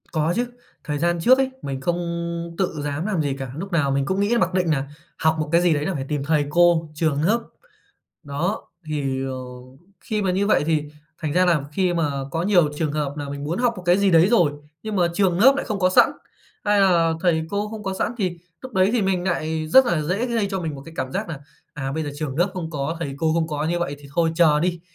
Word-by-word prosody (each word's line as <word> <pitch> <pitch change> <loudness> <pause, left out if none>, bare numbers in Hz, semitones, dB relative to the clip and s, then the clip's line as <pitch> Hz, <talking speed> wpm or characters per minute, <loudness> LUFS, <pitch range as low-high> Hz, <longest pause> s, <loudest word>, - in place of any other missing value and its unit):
Có 160 +1 +1
chứ, 245 +1 0 0.4
thời 150 -2 -3
gian 170 +2 +1
trước 255 +10 +5
ấy 270 -1 +1
mình 135 -1 -4
không 170 +4 0 0.6
tự 175 -5 -1
dám 145 +3 -3
làm 195 -6 0
gì 140 -2 -1
cả. 135 -2 -5
Lúc 195 +4 -6
nào 145 -5 +1
mình 135 0 +1
cũng 190 +5 -1
nghĩ 210 +4 +2
mặc 185 -4 +1
định 180 -2 +1
nà 140 -3 0 0.3
học 160 0 +2
một 150 -1 -2
cái 170 +1 +4
gì 175 -2 +3
đấy 145 0 -1
là 190 - -1
phải 135 -4 -4
tìm 145 -2 -1
thầy 150 0 +1
cô, 170 0 +3
trường 150 -2 0
lớp. 225 +6 +2 0.8
Đó, 160 +7 -3 0.2
thì, 135 -3 -2
ờ, 135 -1 -3 0.7
khi 215 -1 -2
mà 190 - +1
như 195 +2 +1
vậy 200 - +3
thì 155 -2 +1 0.3
thành 155 -2 -3
ra 180 +3 +4
là 165 -5 +3
khi 180 +2 +1
mà 165 -4 +1 0.2
có 165 +3 -1
nhiều 180 -5 +4
trường 155 -2 -1
hợp 145 -2 -2
nà 145 -1 -5
mình 140 0 -5
muốn 160 +4 -2
học 240 -1 +2
một 185 - -8
cái 175 +2 +4
gì 200 -1 +3
đấy 170 +1 +5
rồi 175 -10 +4 0.3
nhưng 215 -1 -3
mà 175 -2 +3
trường 185 -2 +2
lớp 265 +7 +7
nại - - -2
không 210 -3 -3
có 185 -1 +3
sẵn - - +6 0.5
hay 205 -1 +3
là 170 -4 +4
thầy 160 -3 +1
cô 205 +1 -1
không 215 0 -7
có 195 -2 -3
sẵn, 215 - -1
thì 180 -4 -1 0.2
lúc 260 -1 -9
đấy 190 -2 +3
thì 240 -3 +2
mình 190 -2 0
nại 160 -3 -1
rất 265 +10 +7
là 170 -6 +1
dễ 185 +10 -1
gây 230 -4 0
cho 190 -1 -2
mình 160 -3 -3
một 135 - -9
cái 165 - -12
cảm 130 0 -3
giác - - -3
nà, 160 -4 -5 0.4
à, 135 -3 -4
bây 160 +2 -2
giờ 145 - -4
trường 145 -2 -4
lớp 175 +4 +2
không 170 -3 -4
có, 150 +1 -3
thầy 140 -4 -3
cô 160 +1 +1
không 165 -1 +1
có 150 -1 -2
như 170 +2 0
vậy 145 -4 -3
thì 145 -1 -14
thôi 165 -1 +2
chờ 155 -3 +4
đi. 175 0 -1
170 Hz, 260 wpm, -23 LUFS, 150-190 Hz, 0.8 s, lớp